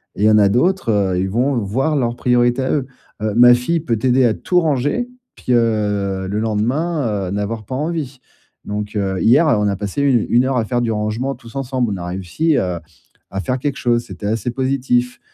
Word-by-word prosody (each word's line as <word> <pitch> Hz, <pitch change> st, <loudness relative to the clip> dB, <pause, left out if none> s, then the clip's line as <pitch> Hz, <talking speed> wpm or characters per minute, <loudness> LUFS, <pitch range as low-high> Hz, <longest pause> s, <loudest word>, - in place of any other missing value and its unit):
et 100 Hz, -, -2 dB
il -, -, +5 dB
y -, -, +6 dB
en 110 Hz, -, +5 dB
a 100 Hz, -2 st, +5 dB
d'autres, 130 Hz, -, +1 dB
heu, 95 Hz, -3 st, +1 dB
ils 95 Hz, +1 st, -1 dB
vont 125 Hz, +6 st, +1 dB
voir 125 Hz, +9 st, 0 dB
leurs 120 Hz, -4 st, 0 dB
priorités 120 Hz, +1 st, +2 dB
à 130 Hz, -, -1 dB
eux. 140 Hz, -4 st, -1 dB, 0.3 s
Heu, 110 Hz, -1 st, -1 dB
ma 120 Hz, +1 st, +8 dB
fille 125 Hz, +8 st, 0 dB
peut 120 Hz, -8 st, -1 dB
t'aider 125 Hz, +3 st, +3 dB
à 115 Hz, -, +3 dB
tout 180 Hz, -, +1 dB
ranger, 150 Hz, -, 0 dB, 0.3 s
puis, -, -, -5 dB
heu, 105 Hz, -5 st, 0 dB
le 100 Hz, +2 st, -2 dB
lendemain, 115 Hz, -, -1 dB
heu, -, -, -5 dB
n'avoir 105 Hz, +2 st, -3 dB
pas 130 Hz, -, -5 dB
envie. 150 Hz, -2 st, -3 dB, 0.5 s
Donc, 105 Hz, +1 st, -4 dB
heu, 95 Hz, -2 st, -1 dB
hier, 135 Hz, -, +5 dB
on 105 Hz, -8 st, +2 dB
a 100 Hz, -, 0 dB
passé 100 Hz, +7 st, -3 dB
u 130 Hz, -6 st, +3 dB
une 120 Hz, +2 st, +3 dB
heure 130 Hz, -1 st, 0 dB
à 115 Hz, -, +1 dB
faire 120 Hz, +2 st, -1 dB
du 115 Hz, -1 st, 0 dB
rangement 110 Hz, +5 st, -2 dB
tous 120 Hz, -1 st, -15 dB
ensemble. 130 Hz, -4 st, -1 dB
On -, -, -4 dB
a 90 Hz, -, -6 dB
réussi 95 Hz, -, -1 dB
à 90 Hz, -2 st, -2 dB, 0.5 s
à 95 Hz, -, -3 dB
faire 125 Hz, +5 st, -1 dB
quelque 140 Hz, +1 st, -2 dB
chose, 120 Hz, -1 st, +1 dB
c'était 100 Hz, -, -7 dB
assez 110 Hz, +2 st, -1 dB
positif. 125 Hz, -1 st, 0 dB
120 Hz, 220 wpm, -19 LUFS, 105-135 Hz, 0.5 s, ma